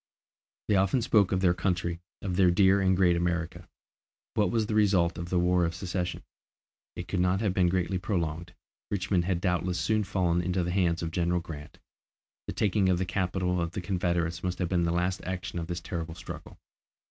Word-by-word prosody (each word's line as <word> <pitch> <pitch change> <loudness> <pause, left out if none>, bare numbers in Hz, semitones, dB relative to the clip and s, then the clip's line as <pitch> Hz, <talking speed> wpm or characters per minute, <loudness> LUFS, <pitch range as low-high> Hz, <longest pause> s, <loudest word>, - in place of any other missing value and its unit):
They 105 - +3
often 100 +6 +2
spoke 105 -5 +3
of 95 -1 +1
their 90 -2 +4
country, 90 -1 -1 0.2
of 95 -2 -2
their 90 -1 +5
dear 95 +2 +4
and 95 -1 +3
great 90 -2 +4
America. 85 0 -2 0.6
What 105 - +2
was 115 -2 +1
the 110 - -3
result 95 -5 +3
of 85 0 -5
the 90 - +1
War 90 0 +3
of 85 0 -1
Secession? 90 -1 -3 0.7
It 90 - -6
could 95 - -2
not 90 +1 +2
have 105 -4 +1
been 90 -2 +3
greatly 90 0 0
prolonged, 85 -2 -3 0.3
Richmond 95 -3 0
had 90 -2 0
doubtless 90 0 0
soon 110 -1 +1
fallen 90 -3 +1
into 90 +1 0
the 90 - -2
hands 85 -3 +1
of 80 - -3
General 85 +1 +1
Grant. 75 -3 -9 0.7
The - - -3
taking 100 -2 +2
of 90 - +3
the 95 - -1
capital 90 0 -1
of 85 0 -3
the 95 - -3
Confederates 85 -2 -1
must 90 -1 -2
have 90 -2 -1
been 85 -2 +1
the 85 - +1
last 90 +2 -1
action 95 -1 -4
of 80 - -5
this 85 -1 -4
terrible 85 -2 -5
struggle. - - -9
90 Hz, 200 wpm, -28 LUFS, 85-95 Hz, 0.7 s, their